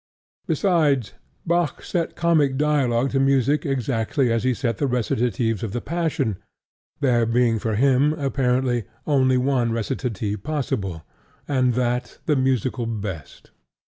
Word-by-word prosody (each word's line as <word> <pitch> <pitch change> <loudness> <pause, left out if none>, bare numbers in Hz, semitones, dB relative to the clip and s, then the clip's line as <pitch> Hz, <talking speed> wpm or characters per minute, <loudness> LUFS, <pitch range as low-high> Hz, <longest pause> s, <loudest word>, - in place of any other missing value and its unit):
Besides, 150 - +1 0.3
Bach 170 -3 0
set 170 -3 -2
comic 155 -6 +2
dialogue 135 -4 +1
to 135 - +1
music 135 +2 +2
exactly 125 0 0
as 115 0 0
he 130 -1 +1
set 115 -4 -2
the 140 - +1
recitatives 120 -2 0
of 110 -3 -4
the 120 - -1
Passion, 150 - -2 0.6
there 120 -4 +3
being 115 -1 +2
for 110 0 -1
him, 135 +5 +3
apparently, 130 -5 0 0.2
only 130 -3 +3
one 125 -2 +1
recitative 110 -3 -3
possible, 110 - -3 0.4
and 130 -4 +1
that 125 0 -1
the 150 - +2
musically 130 -2 0
best. 100 - -6
125 Hz, 130 wpm, -23 LUFS, 115-140 Hz, 0.6 s, there